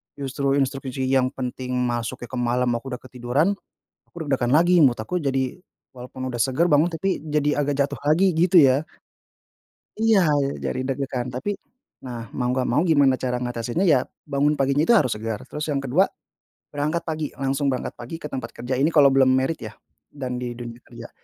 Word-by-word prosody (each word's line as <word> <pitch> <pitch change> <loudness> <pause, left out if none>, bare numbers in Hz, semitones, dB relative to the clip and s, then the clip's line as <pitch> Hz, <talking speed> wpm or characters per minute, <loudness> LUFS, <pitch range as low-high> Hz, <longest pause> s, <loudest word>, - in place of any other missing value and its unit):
justru 140 0 -1
instruksi 135 -1 -2
yang 130 -1 +3
penting 125 0 -5 0.2
masuknya 120 0 -4
ke 130 - -4
malam 120 +1 +1
aku 120 +3 -5
udah - - -12
ketiduran, 130 +5 0 0.6
aku - - -62
deg-degan 130 -3 0
lagi 175 +1 +5
mood 125 -5 +4
aku 145 +12 -2
jadi, 135 -2 -1 0.4
walaupun 125 +1 -7
udah 120 - -5
seger 135 +7 +2
bangun, 150 +4 +4
tapi 190 +4 -1
jadi 150 -1 0
agak 145 0 -1
jatuh 145 - -7
lagi 165 +6 +3
gitu 175 +2 +4
ya. 135 +2 +4 1.2
Iya 220 -3 +4 0.4
jadi 130 - -2
deg-degan, 130 -2 -3
tapi 200 +11 -3 0.4
nah 120 -4 -8
mau 125 -1 -2
nggak 130 0 +1
mau - - +1
gimana 140 -4 +5
cara 125 -1 -1
ngatasinya, 120 +7 -2
ya 145 -7 +3 0.2
bangun 145 +1 +1
paginya 140 +3 +2
itu 235 - +7
harus 130 -10 +2
segar, 110 0 -5
terus 150 +1 -5
yang 140 - 0
ke-2 155 +10 +3 0.7
berangkat 150 +4 -1
pagi, 155 -2 -2
langsung 135 +1 -1
berangkat 130 - -3
pagi 120 +7 -7
ke 165 - -10
tempat 130 -3 -4
kerja, 125 +2 -3
ini 150 - +4
kalau 140 -2 +7
belum 135 -1 +5
married 130 +5 +1
ya - - -7 0.4
dan 130 -3 -4
di 125 -1 -4
dunia 120 -1 -8
kerja. - - -11
135 Hz, 180 wpm, -23 LUFS, 125-150 Hz, 1.2 s, itu